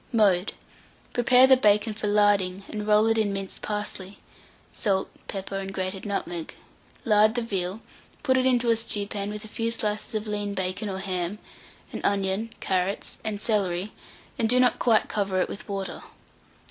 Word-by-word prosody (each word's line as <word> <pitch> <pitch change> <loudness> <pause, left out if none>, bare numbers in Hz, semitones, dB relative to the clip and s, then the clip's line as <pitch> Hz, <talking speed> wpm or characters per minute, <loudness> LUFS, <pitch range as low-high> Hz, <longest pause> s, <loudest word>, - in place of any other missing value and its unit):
Mode. 205 -5 +3 0.6
Prepare 250 +1 +6
the 265 0 +7
bacon 210 -2 +3
for 210 0 -3
larding, 205 -2 +2
and 210 -1 -5
roll 210 0 +5
it 225 0 +2
in 210 -2 +1
minced 195 -1 -5
parsley, 205 -2 -4 0.6
salt, 195 -4 +1 0.2
pepper, 195 0 -4
and 195 0 -5
grated 190 +1 -4
nutmeg; 175 -5 -4 0.5
lard 215 0 +4
the 240 - 0
veal, 195 -1 -2 0.4
put 260 -3 +3
it 260 0 +3
into 245 -2 +4
a - - +4
stewpan 205 -2 -2
with 210 +1 -6
a - - -9
few 225 +1 -2
slices 215 -1 -1
of 215 0 -2
lean 205 -1 -3
bacon 190 +3 -2
or 190 - -3
ham, 185 0 -2 0.5
an - - -5
onion, 200 +2 0
carrots, 190 +1 -1
and 215 -2 -3
celery; 200 -3 0 0.5
and 225 - +2
do 250 +1 +5
not 250 -1 +3
quite 225 -3 +3
cover 195 -3 -1
it - - +1
with 205 - -8
water. 195 -1 -4
205 Hz, 170 wpm, -26 LUFS, 195-220 Hz, 0.6 s, the